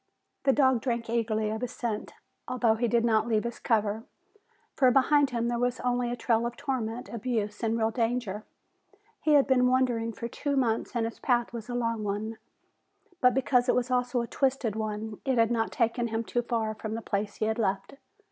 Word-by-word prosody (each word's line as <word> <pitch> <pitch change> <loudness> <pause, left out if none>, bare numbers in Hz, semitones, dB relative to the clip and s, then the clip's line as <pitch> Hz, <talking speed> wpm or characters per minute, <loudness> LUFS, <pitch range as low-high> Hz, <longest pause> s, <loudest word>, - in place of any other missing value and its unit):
The 270 - +6
dog 260 -3 +3
drank 235 -3 -2
eagerly 220 -2 0
of 220 +1 -4
his 250 -1 -3
scent, 225 -4 -4 0.3
although 245 -3 +2
he 235 +2 0
did 235 0 +2
not 220 -1 +2
leave 220 -2 +1
his 235 0 -5
cover, 220 -1 0 0.7
for 260 - +5
behind 280 +2 +4
him 235 -2 -1
there 240 0 -1
was 245 0 0
only 245 -1 0
a 240 - -2
trail 230 -1 +1
of 240 - -7
torment, 245 -4 -3
abuse 220 -3 -3
and 225 0 0
real 220 0 +1
danger. 230 -3 -1 0.8
He 305 - +3
had 285 -2 +6
been 250 -2 +3
wandering 250 -3 +1
for 235 - -5
two 280 +4 -2
months 235 -2 0
and 230 -1 +1
his 230 - -6
path 240 -1 +1
was 235 0 -7
a 245 - -3
long 230 -2 -1
one, 210 +2 -3 0.8
but 250 -2 +4
because 255 -1 +2
it - - +4
was 250 +1 0
also 250 0 +1
a 235 - -4
twisted 260 -4 0
one 215 0 -4
it 265 -2 0
had 230 0 +4
not 225 -1 0
taken 235 +1 0
him 225 0 -2
too 240 +1 -1
far 230 -2 -1
from 220 0 -5
the 225 - -5
place 205 +1 -2
he 215 - -1
had 220 +2 -1
left. 195 -2 -1
235 Hz, 205 wpm, -28 LUFS, 220-250 Hz, 0.8 s, The